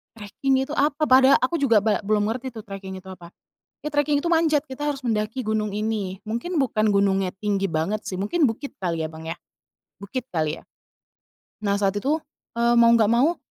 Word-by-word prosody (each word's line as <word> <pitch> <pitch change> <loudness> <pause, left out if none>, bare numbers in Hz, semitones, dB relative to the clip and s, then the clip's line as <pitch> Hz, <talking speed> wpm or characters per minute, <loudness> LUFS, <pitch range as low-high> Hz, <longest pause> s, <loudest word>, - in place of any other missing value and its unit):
Treking 260 +6 -1
itu - - -8
apa, 295 +2 +1
pada 260 +1 +7
aku 260 - +1
juga 230 -7 +4
ba 215 -1 +2
belum 210 0 +1
ngerti 255 +2 -5
tuh, 220 -3 -10
treking 190 -1 -7
itu 190 - -17
apa, 180 -2 -11 0.5
"Ya, 300 - -4
treking 290 0 +1
itu 340 - -1
manjat, 320 -3 +3
kita 290 +3 -4
harus 280 -2 -2
mendaki 225 +2 -1
gunung 215 -2 -1
ini." 210 -3 -3
Mungkin 240 +9 -2
bukan 215 -4 +1
gunungnya 195 -2 +1
tinggi 200 -2 0
banget, 165 +7 -2
sih, - - -4
mungkin 210 - +1
bukit 240 +5 -4
kali 170 -3 -2
ya, 155 - -4
Bang, 160 0 -10
ya, 165 - -3 0.7
bukit 235 +5 -5
kali, 155 -2 -1
ya. - - -24 1.0
Nah, 200 0 +1
saat 195 0 +1
itu, 285 +10 0 0.4
eee, 235 0 +3
mau 235 0 +6
nggak 225 -3 +4
mau 275 +9 +3
215 Hz, 195 wpm, -24 LUFS, 195-270 Hz, 1.0 s, pada